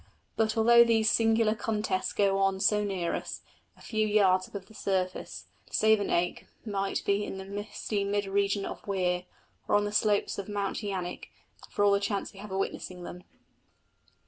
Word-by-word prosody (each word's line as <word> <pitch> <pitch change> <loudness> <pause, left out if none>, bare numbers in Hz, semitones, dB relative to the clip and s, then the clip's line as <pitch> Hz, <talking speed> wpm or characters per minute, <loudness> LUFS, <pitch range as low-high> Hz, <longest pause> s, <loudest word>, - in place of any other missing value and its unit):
But, 220 0 +1
although 235 +1 +7
these 225 -2 +3
singular 225 -1 +3
contests 210 -4 -1
go 195 -1 +2
on 195 -1 +2
so 210 +1 +3
near 190 -4 -2
us, - - -4 0.4
a - - -19
few 215 -2 0
yards 190 -3 +3
above 200 -2 -8
the 220 - -18
surface, 185 -3 -2 0.2
Savernake 205 -5 +1 0.2
might 195 -2 -2
be 200 +1 +1
in 195 - -5
the 190 - -7
misty 205 +1 -3
mid 200 0 0
region 200 0 0
of - - -8
Weir, 180 -2 0 0.4
or - - +3
on 205 0 +3
the 205 - -3
slopes 205 -1 +1
of 200 - -6
Mount 205 0 -2
Yanik, 190 -4 -4 0.4
for 205 - 0
all 200 - +5
the 200 - +3
chance 200 0 -2
we 195 - -13
have 210 0 -9
of 190 - -2
witnessing 185 -2 -4
them. 180 +1 -8
200 Hz, 175 wpm, -29 LUFS, 195-215 Hz, 0.4 s, although